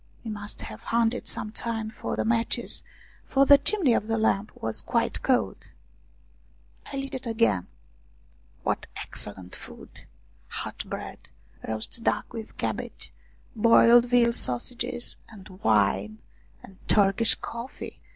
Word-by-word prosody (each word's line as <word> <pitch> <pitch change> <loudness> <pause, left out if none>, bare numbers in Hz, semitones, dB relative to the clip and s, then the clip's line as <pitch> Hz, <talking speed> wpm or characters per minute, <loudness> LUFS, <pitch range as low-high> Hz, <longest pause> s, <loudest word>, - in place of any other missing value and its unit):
We 225 - -3
must 205 0 -4
have - - -8
hunted 235 +1 +1
some 215 - -4
time 225 -1 -3
for - - -4
the - - -1
matches, 230 0 0 0.5
for 275 0 +4
the 285 0 +8
chimney 300 - +2
of 215 - 0
the 225 0 +1
lamp 215 -1 +1
was 110 0 -1
quite 235 -1 0
cold. 255 -2 0 1.2
I 275 - -4
lit 275 0 -4
it 260 -2 -4
again. 225 - +2 1.0
What - - -1
excellent 95 -3 -3
food! - - -12 0.4
Hot - - -3
bread, - - -7 0.4
roast 110 - -2
duck - - 0
with 225 -1 -8
cabbage, - - -4 0.4
boiled 230 +2 +7
veal 240 -1 +4
sausages, 235 - 0
and 205 -4 -12
wine! 105 -1 +2 0.5
And 190 -1 -14
Turkish 205 +2 +4
coffee 235 +3 -7
225 Hz, 130 wpm, -27 LUFS, 195-240 Hz, 1.2 s, the